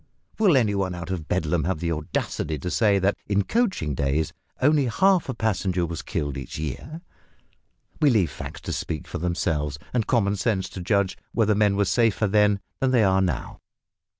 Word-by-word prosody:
Will 190 -10 +5
any 110 -5 +2
one 95 -2 -1
out 90 +1 -6
of 85 -4 -4
Bedlam 80 -2 0
have 95 -1 0
the 85 0 -1
audacity 75 0 -2
to 90 +6 -4
say 105 -4 +3
that 100 +1 +2
in 100 0 +2
coaching 190 - 0
days 70 +3 0 0.3
only 145 +1 +4
half 185 - +3
a 130 - -2
passenger 95 -5 0
was 85 -1 -5
killed 70 -2 -3
each 65 -2 -7
year? 80 - -5 1.0
We 150 - +6
leave 100 - +2
facts - - -8
to - - -4
speak 75 -3 -4
for - - -5
themselves, 80 -4 -1 0.2
and 115 -4 0
common 105 -5 +2
sense 95 -3 0
to 95 0 -7
judge 100 +1 0
whether 110 -2 +3
men 105 -1 +3
were 100 - +3
safer 115 0 +2
then 105 0 +3 0.2
than 135 - +2
they 125 -4 +4
are 95 -1 +3
now. 85 -9 -2
95 Hz, 185 wpm, -25 LUFS, 85-110 Hz, 1.0 s, We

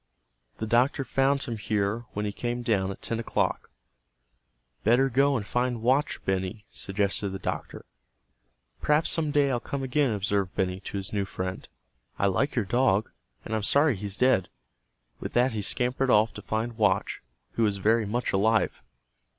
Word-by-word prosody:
The 110 - -3
doctor 125 +6 +2
found 135 +1 +1
him 115 -2 -4
here 105 +2 -1
when 105 +1 -2
he 105 - -1
came 120 +3 -3
down 100 -5 +1
at 95 - -8
ten 115 - -2
o'clock. 115 - -1 1.1
"Better 125 +5 +4
go 135 +2 +3
and 105 - -4
find 120 0 -1
Watch, 135 +5 +1
Benny," 95 +3 -2
suggested 100 0 -1
the 95 - -5
doctor. - - -5 1.0
"Perhaps 150 +2 +3
some 160 -2 0
day 145 -1 +3
I'll 120 - 0
come 140 +2 -4
again," 135 +1 +1
observed 100 -2 -1
Benny 95 -1 -1
to 100 - -6
his 95 +1 -6
new 100 -2 0
friend. 95 0 -5 0.5
"I - - +1
like 130 +9 +1
your 120 -5 +1
dog, 115 -1 +2 0.3
and 110 - -5
I'm 110 - 0
sorry 140 +5 +4
he's 100 0 -5
dead." 125 -8 +3 0.7
With - - -6
that 125 +2 +3
he 110 - -3
scampered 125 +5 0
off 110 -1 +4
to - - -8
find 110 +1 -3
Watch, 100 -1 +1 0.3
who - - -3
was 105 -3 +2
very 110 +2 +2
much 120 +4 -1
alive. 110 +3 +2
110 Hz, 170 wpm, -27 LUFS, 100-130 Hz, 1.1 s, Better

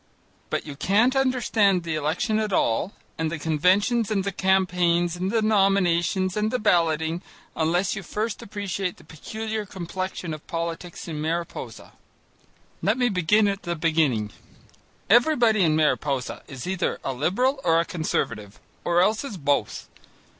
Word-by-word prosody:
But - - -2
you 145 -2 -7
can't 220 - +2
understand 225 -8 +2
the 165 -1 -3
election 160 +9 0
at 215 -1 -1
all, 170 - +1 0.3
and 160 -1 -1
the 170 - -3
conventions 185 +9 +2
and 200 -3 0
the 200 - -2
campaigns 180 -3 +2
and 180 +2 -2
the 225 +1 +1
nominations 190 -3 +2
and 210 0 +1
the 250 - 0
balloting, 165 -5 +1 0.3
unless 175 +5 +1
you 205 - -5
first 215 +4 -3
appreciate 195 -3 -4
the - - -17
peculiar 220 +8 -5
complexion 185 -2 -5
of 155 - -10
politics 170 +1 -5
in 155 -2 -4
Mariposa. 160 -7 -4 0.9
Let 215 +5 +1
me 245 -1 +2
begin 205 +2 +3
at 200 0 -2
the 175 0 -3
beginning. 155 -10 +1 0.8
Everybody 235 - +4
in 160 -3 +3
Mariposa 145 -4 0
is 135 -3 -8
either 185 -1 -1
a 135 - -2
Liberal 250 - 0
or 165 -1 +4
a 170 - +1
Conservative 105 - -3 0.2
or 175 0 +3
else 215 +5 +1
is 225 -9 -6
both. 140 - -1
180 Hz, 150 wpm, -25 LUFS, 160-210 Hz, 0.9 s, Everybody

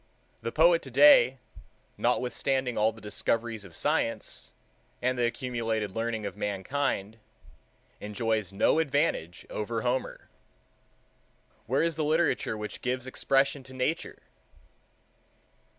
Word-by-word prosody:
The 115 - -3
poet 165 +3 +5
today, 135 -1 +6 0.6
notwithstanding 125 0 0
all 110 +1 +3
the 110 0 -15
discoveries 115 +1 -1
of 90 -4 -12
science, - - -1 0.5
and 125 +1 0
the 120 -1 +2
accumulated 115 -5 -2
learning 115 -1 -2
of - - -5
mankind, 105 +1 -2 0.8
enjoys 110 -1 -2
no 100 +10 +3
advantage 145 - 0
over 110 +1 -3
Homer. 125 +1 -2 1.4
Where 130 +6 +2
is 165 -1 -1
the 155 - 0
literature 155 -7 +1
which 105 0 -6
gives 125 0 -2
expression 135 +2 +1
to 130 0 -13
Nature? 140 +6 -2
120 Hz, 110 wpm, -28 LUFS, 110-135 Hz, 1.4 s, today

